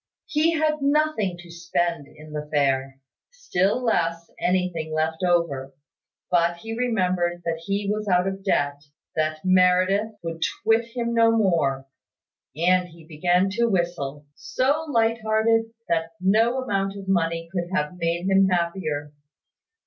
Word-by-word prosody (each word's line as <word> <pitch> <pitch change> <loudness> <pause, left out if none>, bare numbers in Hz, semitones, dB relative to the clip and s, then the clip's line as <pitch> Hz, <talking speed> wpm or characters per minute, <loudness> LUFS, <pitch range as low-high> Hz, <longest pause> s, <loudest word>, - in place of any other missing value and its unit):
He 320 +2 +2
had 305 -1 0
nothing 280 - +1
to 175 -1 -13
spend 170 -3 -2
in 155 0 -14
the 150 0 -4
fair; 135 -2 0 0.3
still 250 - 0
less, 170 -7 0
anything 180 -3 -1
left 160 +1 -1
over. 150 -7 0 0.6
But 170 -1 +2
he 225 +5 -6
remembered 180 -7 0
that 165 -1 -2
he 200 0 -1
was 210 +1 -2
out 180 -1 +3
of 195 0 -4
debt, 145 -7 0 0.3
that 155 +1 -1
Meredith, 185 +3 +3
would 165 -1 -5 0.2
twit 225 +1 +3
him 235 -1 -1
no 230 -1 +5
more, 170 -12 +1 0.7
and 180 +3 +2
he 165 -2 -16
began 175 +4 +1
to 235 +4 +1
whistle, 170 -7 -2
so 285 - -1
light 230 -3 +1
hearted, 220 +1 +2 0.2
that 165 0 -1
no 225 +7 +2
amount 195 -3 -1
of 195 -1 -9
money 165 -3 0
could 175 -2 -3
have 150 -2 -1
made 170 +2 -1
him 195 0 +4
happier. 170 -5 -1
180 Hz, 140 wpm, -24 LUFS, 165-220 Hz, 0.7 s, no